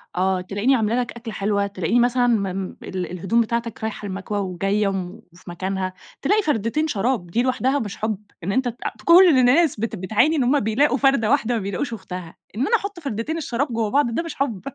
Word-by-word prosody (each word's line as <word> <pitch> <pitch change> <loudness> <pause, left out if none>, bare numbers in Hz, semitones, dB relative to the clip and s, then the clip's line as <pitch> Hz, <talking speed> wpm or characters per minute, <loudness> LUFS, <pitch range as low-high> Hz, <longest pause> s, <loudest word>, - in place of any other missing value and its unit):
آه، 185 0 +1
تلاقيني 205 +8 +1
عاملة 225 +1 +1
لك 245 - -4
أكلة 235 -2 -8
حلوة، 200 0 0
تلاقيني 200 +4 0
مثلًا 245 0 +3
م 220 -4 +2
م 190 0 -5
ال 180 -2 -4
الهدوم 190 +6 +1
بتاعتك 230 0 -3
رايحة 220 -1 -4
المكوى 195 +2 -4
وجاية 195 +2 0
وفي 180 -2 -6
مكانها، 185 +1 -3 0.3
تلاقي 420 +9 +3
فردتين 300 - 0
شراب 225 - -1
دي 230 +8 0
لوحدها 260 +2 +1
مش 205 -3 -5
حب؟ 215 -2 -1 0.3
إن 195 - -1
أنت 260 +2 +1
ت 240 - -3 0.3
كل 355 +2 +8
الناس 265 0 +4
بت 225 0 -2
بتعاني 215 - +2
إن 270 - +2
هُم 280 +4 +3
بيلاقوا 255 +6 +2
فردة 270 -6 +3
واحدة 245 -4 +2
ما 220 - -1
بيلاقوش 200 +6 -3
أختها، 180 -4 -7 0.2
إن 250 - 0
أنا 465 - +4
أحط 400 -4 -3
فردتين 275 +2 -3
الشراب 280 -2 -1
جوا 225 -2 0
بعض، 255 -3 +1
ده 335 - 0
مش 335 - -7
حب؟ 235 -9 -2
225 Hz, 205 wpm, -22 LUFS, 195-265 Hz, 0.3 s, كل